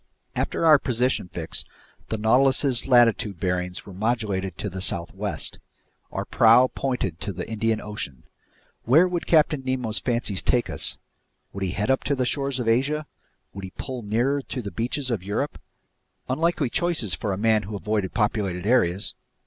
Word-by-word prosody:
After - - -1
our 155 -3 +8
position 125 -6 0
fix, 85 -1 -4 0.5
the 110 - -1
Nautilus's 130 +3 +3
latitude 115 -7 +4
bearings 90 -1 -2
were 100 - -10
modulated 100 -3 -1
to - - -3
the 95 -1 -5
southwest. 85 -2 -2 0.5
Our - - -3
prow 120 +3 +5
pointed 125 - -2
to 105 - -3
the 90 -1 -6
Indian 110 0 0
Ocean. 105 - -6 0.6
Where 155 +10 +6
would 175 -2 -3
Captain 150 -3 +3
Nemo's 125 -4 -1
fancies 120 -6 0
take 120 -1 +1
us? - - 0 0.6
Would 100 - -4
he 90 - -1
head 105 +6 0
up 135 - +1
to 140 - +1
the 130 -1 0
shores 135 0 -1
of 120 - -2
Asia? 140 +7 +1 0.5
Would 100 - -8
he 95 - -7
pull 130 -3 -5
nearer 120 +7 0
to 130 -2 -6
the 100 - -5
beaches 125 +3 -2
of 110 -6 -1
Europe? 105 +10 -3 0.7
Unlikely 155 -1 0
choices 165 - 0
for 100 +7 -2
a 95 - -2
man 110 +1 +3
who 105 +1 -6
avoided 100 0 -2
populated 100 -5 0
areas! 100 -5 +2
115 Hz, 165 wpm, -25 LUFS, 100-130 Hz, 0.7 s, our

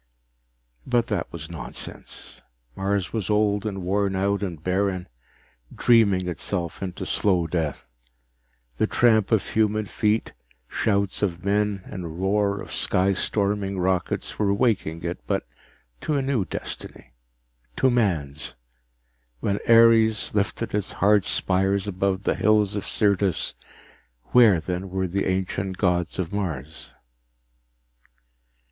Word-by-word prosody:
But 120 -2 +2
that 100 -6 -2
was 80 0 -7
nonsense. 85 - -8 0.3
Mars 100 -1 -1
was 110 -4 -2
old 105 0 +2
and 95 -3 -4
worn 100 +1 0
out 100 +2 0
and 85 -6 -5
barren, 95 0 0 0.7
dreaming 100 -6 +4
itself 85 0 -3
into 95 -2 -4
slow 90 -5 +2
death. 80 -4 -2 0.9
The - - +3
tramp 110 -4 +3
of 110 -4 +2
human 110 -1 +1
feet, 105 +1 0 0.3
shouts 100 - 0
of 90 -3 -2
men 100 -1 +1
and 85 -4 -7
roar 100 +1 +1
of - - -8
sky 95 +2 +2
storming 100 0 -1
rockets, 90 -1 -1
were 100 -2 +2
waking 100 -7 0
it, 85 +1 -3
but - - -1 0.6
to 155 - -1
a 140 - +1
new 130 -7 0
destiny, 60 -6 -8 0.6
to 130 - +3
man's. 85 - -1 0.8
When 100 +8 -1
Ares 115 -2 +5
lifted 105 +2 -1
its 105 -1 -1
hard 100 -1 +3
spires 95 +1 +1
above 95 0 -1
the - - +2
hills 105 -1 +2
of 100 - -4
Syrtis, 100 -3 +1 0.8
where 115 -8 +6
then 90 +3 -4
were 95 0 -1
the 95 +3 -1
ancient 95 0 -2
gods 90 -3 0
of 90 0 -3
Mars? 80 -7 -4
100 Hz, 125 wpm, -24 LUFS, 90-105 Hz, 0.9 s, where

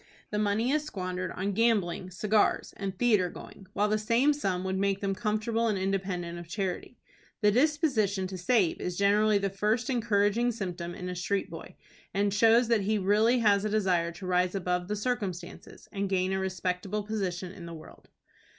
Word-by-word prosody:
The 210 - -1
money 210 +4 +1
is 305 +1 +1
squandered 185 - -4
on 195 +2 -2
gambling, 200 -5 +1
cigars, 210 +3 +1
and 195 -1 -5
theatre 210 -6 +3
going, 190 +2 -12
while 210 - +2
the 215 0 +1
same 235 +7 +3
sum 190 -10 -2
would 190 0 -2
make 195 0 +1
them 195 -1 -1
comfortable 220 +2 0
and 210 -3 0
independent 185 -3 -2
of 170 - -10
charity. 190 +5 -4 0.4
The 210 -1 +5
disposition 245 - +1
to 185 0 -6
save 185 -1 +1
is 180 -1 -3
generally 205 +1 +4
the 195 -1 -1
first 215 +6 0
encouraging 230 0 +2
symptom 175 -5 -5
in 180 - -6
a 180 - -4
street 195 +2 -2
boy, - - -9 0.4
and 200 0 +1
shows 230 +3 +5
that 230 -3 +2
he 210 +3 0
has 205 - -1
really 220 +5 +3
a 200 -1 +5
desire 185 -5 +1
to 180 +3 -9
rise 180 +1 +1
above 180 -1 -1
his 210 -1 -2
circumstances, 195 -9 -4
and 200 -1 -2
gain 190 0 +1
a 190 - 0
respectable 190 +2 -2
position 190 -4 -3
in 175 -3 -10
the 170 - -7
world. 155 - -14
200 Hz, 185 wpm, -29 LUFS, 185-215 Hz, 0.4 s, The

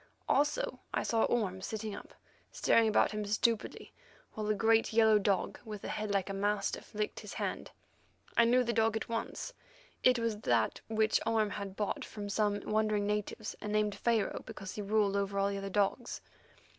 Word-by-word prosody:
Also, - - +1 0.2
I - - +1
saw 225 -1 +2
Orme 195 -6 0
sitting 215 +2 -4
up, - - -10 0.4
staring 230 -1 +3
about 215 - +3
him 210 -1 -3
stupidly, 215 +2 -1 0.4
while 215 -1 -3
a 215 - +2
great 225 +1 +3
yellow 220 -1 +6
dog, 195 -2 0
with 210 -3 -7
a - - -4
head 215 0 -3
like 195 -2 +1
a 195 - -3
mastiff, 205 +1 -2
licked 210 0 -2
his - - -8
hand. - - -3 0.7
I 235 - +6
knew 250 +2 +4
the 235 -1 -1
dog 225 0 +2
at - - -6
once; 230 - -4 0.5
it 255 -1 +6
was 230 -2 -1
that 115 - +1
which 220 0 +2
Orme 220 -2 +1
had 200 -2 -5
bought 210 -1 -2
from 205 -1 -7
some 205 0 +1
wandering 215 -1 +1
natives, 210 +1 -2
and 210 - -4
named 210 -1 +1
Pharaoh 220 0 0
because 195 0 -8
he 210 - -4
ruled 205 -1 +2
over 200 0 -1
all 200 0 +1
other 195 0 -4
dogs. 205 +5 0
210 Hz, 180 wpm, -32 LUFS, 200-225 Hz, 0.7 s, yellow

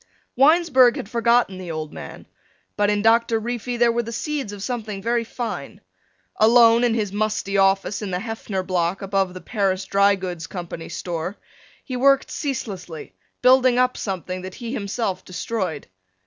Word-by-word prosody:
Winesburg 270 -3 +5
had - - -5
forgotten 235 -4 +2
the 180 -2 -7
old 155 -1 -5
man, - - -9 0.5
but 205 0 +2
in 205 0 +1
Doctor 230 0 +3
Reefy 240 +1 -4
there 240 0 +4
were 235 +1 0
the 230 0 -7
seeds 280 -2 -3
of 205 -1 -7
something 220 -5 -4
very 235 +3 0
fine. 230 +1 -6 0.6
Alone 230 +1 +6
in 235 -2 +2
his 205 -4 -2
musty 210 -1 -1
office 195 +1 +2
in 205 - -4
the 180 - -1
Heffner 210 -2 -4
Block 180 0 -1
above 195 -2 0
the 185 - -8
Paris 195 -4 -1
Dry 200 0 +3
Goods 180 -4 -6
Company's 170 -3 -7
store, 175 +2 -4 0.5
he 255 - -5
worked 275 +2 +3
ceaselessly, 195 - -5 0.3
building 255 -1 +5
up 250 0 +2
something 185 -2 -4
that 185 0 -8
he 235 0 -6
himself 200 -4 -3
destroyed. 185 -4 -4
210 Hz, 160 wpm, -22 LUFS, 190-240 Hz, 0.6 s, Alone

